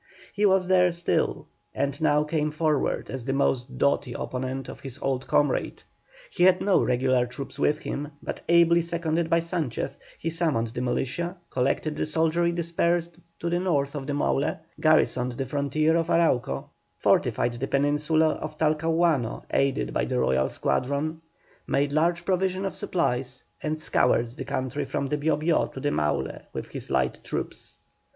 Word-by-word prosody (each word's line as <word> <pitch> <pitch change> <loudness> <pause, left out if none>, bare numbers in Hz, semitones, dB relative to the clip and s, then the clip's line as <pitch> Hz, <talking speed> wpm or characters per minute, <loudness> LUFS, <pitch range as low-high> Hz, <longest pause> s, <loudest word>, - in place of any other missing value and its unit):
He 205 0 +3
was 190 -1 +3
there 180 -1 +4
still 170 0 -1 0.3
and 140 +2 -1
now 150 -1 +3
came 150 0 0
forward 155 -1 0
as 130 -2 -4
the 135 +2 -1
most 130 -2 0
doughty 140 -2 +1
opponent 130 +2 -4
of - - -8
his 135 -3 -7
old 135 -1 -2
comrade. 145 -3 +1 0.5
He - - -4
had 185 0 +6
no 200 - +3
regular 125 0 +2
troops 135 +3 -8
with 150 - +2
him; 150 -1 -4 0.2
but - - -5
ably 170 0 +5
seconded 170 0 -1
by 165 0 +3
Sanchez, 165 -7 -3 0.2
he 165 - -3
summoned 155 -9 0
the 120 - -5
militia, 155 +8 -2
collected 135 +4 0
the - - -1
soldiery 165 +2 +2
dispersed 170 0 -1 0.2
to 170 - -2
the 175 +1 +1
north 145 -6 0
of 140 -2 -5
the 145 - -1
Maule, 145 0 0 0.2
garrisoned 155 -5 +3
the 135 +3 -3
frontier 145 +4 +1
of 165 -1 +1
Arauco, 165 -8 +1 0.3
fortified 120 - +2
the 125 +3 -3
Peninsula 150 +3 +2
of 155 - -6
Talcahuano, 155 -4 +1
aided 140 0 +1
by - - +1
the 125 -1 -1
royal 65 - +2
squadron, 145 +5 -1 0.5
made 140 +1 +1
large 170 +3 +1
provision 190 0 0
of 195 - -2
supplies, 130 -7 -1 0.2
and 155 0 -2
scoured 120 -5 +2
the 130 +3 -8
country 140 +1 -2
from 135 +1 -2
the 150 - 0
Bio 150 0 +1
Bio 160 +2 +2
to - - -9
the - - 0
Maule 75 0 -1
with - - -5
his - - -6
light 65 -1 0
troops. - - -5
150 Hz, 165 wpm, -26 LUFS, 130-170 Hz, 0.5 s, had